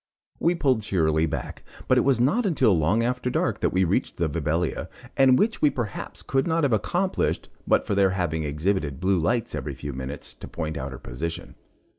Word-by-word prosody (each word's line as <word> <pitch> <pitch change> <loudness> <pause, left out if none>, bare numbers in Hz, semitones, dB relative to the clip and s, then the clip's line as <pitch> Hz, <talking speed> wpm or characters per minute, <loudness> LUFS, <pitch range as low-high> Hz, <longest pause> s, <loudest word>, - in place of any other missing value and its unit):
We 170 +2 +2
pulled 130 -8 +2
cheerily 80 -5 +1
back, 70 -5 -5 0.3
but 130 - +4
it - - +4
was 135 -3 +2
not 150 - +3
until 135 - +3
long 90 +9 +2
after 125 +1 -1
dark - - 0
that - - +2
we 95 +1 +2
reached 85 - 0
the 85 - +1
'Vibelia,' 80 +2 -1 0.3
and 130 -1 +5
which 225 - +1
we 150 - +5
perhaps 120 -7 -5
could 135 +3 0
not 165 -1 +1
have 135 -5 +2
accomplished, 175 - 0 0.2
but - - +3
for - - -1
their 100 -1 +4
having 90 -4 -1
exhibited 75 -1 -1
blue 95 0 +2
lights 115 +8 0
every - - -4
few 70 -1 -6
minutes 65 +2 -6
to - - -10
point 80 -1 -4
out 70 -3 -4
her 65 - -7
position. 80 +8 -5
95 Hz, 200 wpm, -25 LUFS, 80-130 Hz, 0.3 s, and